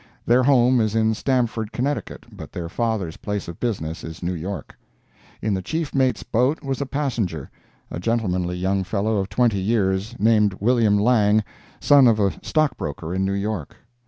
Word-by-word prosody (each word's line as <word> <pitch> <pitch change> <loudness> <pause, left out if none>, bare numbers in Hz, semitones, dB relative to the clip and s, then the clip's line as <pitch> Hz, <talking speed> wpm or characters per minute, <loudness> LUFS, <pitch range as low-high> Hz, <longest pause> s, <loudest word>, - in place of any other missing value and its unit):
Their 120 +2 +4
home 125 -2 +4
is 110 0 0
in 110 0 +2
Stamford, 115 -3 -1
Connecticut, 140 +4 -3
but - - -10
their 85 -1 -5
father's 105 -5 -2
place 105 0 -4
of 85 - -8
business 85 -9 -3
is 80 +2 -8
New 90 +1 -1
York. 90 +4 -6 0.7
In 110 - +1
the 95 - -1
chief 160 - -3
mate's 130 -2 +1
boat 125 +8 0
was 135 0 -3
a 140 - -2
passenger—a 95 - -5
gentlemanly 90 -5 -1
young 95 +1 0
fellow 105 +3 -1
of 95 0 -2
twenty 110 -1 +2
years, 100 +1 0
named 105 -2 +3
William 115 -2 +3
Lang, 105 -1 +3 0.4
son 140 -3 +6
of 110 -2 +3
a 100 -2 +2
stockbroker 85 - -1
in 95 +1 0
New 95 0 0
York. 100 -5 -3
105 Hz, 165 wpm, -22 LUFS, 95-120 Hz, 0.7 s, son